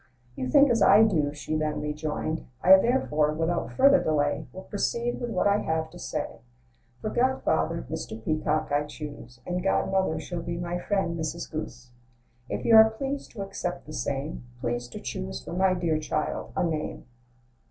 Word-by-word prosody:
"You 130 - -3
think 280 - +6
as 230 - +2
I 205 +3 +7
do," 160 -10 +2
she 150 +1 -4
then 155 -1 -1
rejoined. 150 +1 -3 0.2
"I, 190 +1 +10
therefore, 155 - +2
without 165 +2 -1
further 275 +1 +5
delay, 145 -1 0
Will 185 - -9
proceed 235 +4 -2
with 240 - -2
what - - 0
I 205 0 +4
have 160 -2 -2
to - - -12
say. - - -4 0.6
For 215 - -3
godfather, 240 - +1
Mr. 110 - -5
Peacock 155 -1 0
I 145 +1 +2
choose; 145 -5 -9
And 180 0 -2
godmother 190 -3 +1
shall 170 +2 -5
be 170 0 -4
my 175 0 -3
friend, 190 -3 -1
Mrs. 160 +2 -4
Goose. 125 -5 -6 0.6
If - - -3
you 230 - +6
are 220 0 +9
pleased 270 +5 -4
to 205 -4 -4
accept 195 -2 -4
the 155 - -9
same, 140 +2 -3 0.2
Please 120 0 -2
to 120 - -8
choose 65 +1 -5
for - - -7
my 185 +1 +3
dear 165 -3 0
child 155 0 -3
a - - +1
name." 160 -3 -3
160 Hz, 175 wpm, -27 LUFS, 150-195 Hz, 0.6 s, I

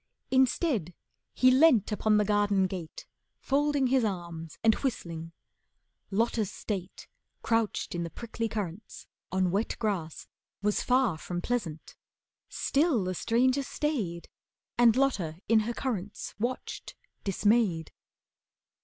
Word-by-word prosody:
Instead, 260 - +2 0.4
he 255 0 +5
leant 260 -6 +5
upon 215 0 +2
the 210 - +3
garden 205 -2 +2
gate, 180 -4 -6 0.3
Folding 285 0 +1
his 255 -1 +3
arms 170 -6 -4
and 225 -1 +6
whistling. 165 - -4 0.8
Lotta's 220 0 0
state, 195 -3 -5 0.4
Crouched 225 -2 0
in 175 - -2
the 170 - -3
prickly 230 +3 -4
currants, 205 -2 -5 0.3
on 185 -1 +1
wet 205 +4 0
grass, 185 -8 -2 0.4
Was 210 0 +1
far 250 -10 +2
from 175 +2 -4
pleasant. 175 -7 -3 0.5
Still 280 - +1
the 185 0 -2
stranger 250 +8 +2
stayed, 240 - -2 0.5
And 235 -2 +5
Lotta 200 -13 +1
in 225 0 +5
her - - -1
currants 210 -7 -4
watched, 240 +4 -4 0.3
dismayed. 200 -4 +2
210 Hz, 120 wpm, -29 LUFS, 180-245 Hz, 0.8 s, and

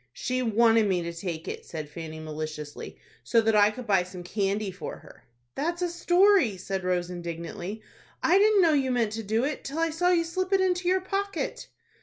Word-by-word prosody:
"She 255 - -2
wanted 225 -1 +4
me 180 -3 +1
to 170 0 -4
take 170 -2 -5
it," - - -5
said 155 -3 -6
Fanny, 160 +1 -8
maliciously, 155 -1 -6 0.3
"so 230 - +3
that 225 -1 +2
I 205 0 +6
could 245 +3 -8
buy 195 -4 +3
some 180 0 -8
candy 200 +2 -1
for 185 - -7
her." - - -17 0.3
"That's 340 - -2
a 350 - 0
story," 350 - +3
said 190 +1 -4
Rose, 180 -1 -1
indignantly; 175 +4 -6 0.4
"I 375 - +5
didn't 415 -2 +5
know 325 -2 +4
you 270 -3 +2
meant 235 -4 +1
to 225 +1 -4
do 220 +3 0
it, 295 +2 -2
till 280 +3 -6
I 330 0 +1
saw 355 +3 +1
you 345 -2 +3
slip 370 +3 -2
it 390 - +5
into 360 -1 +1
your 375 +1 +3
pocket." 400 +5 -3
225 Hz, 205 wpm, -27 LUFS, -, 0.4 s, I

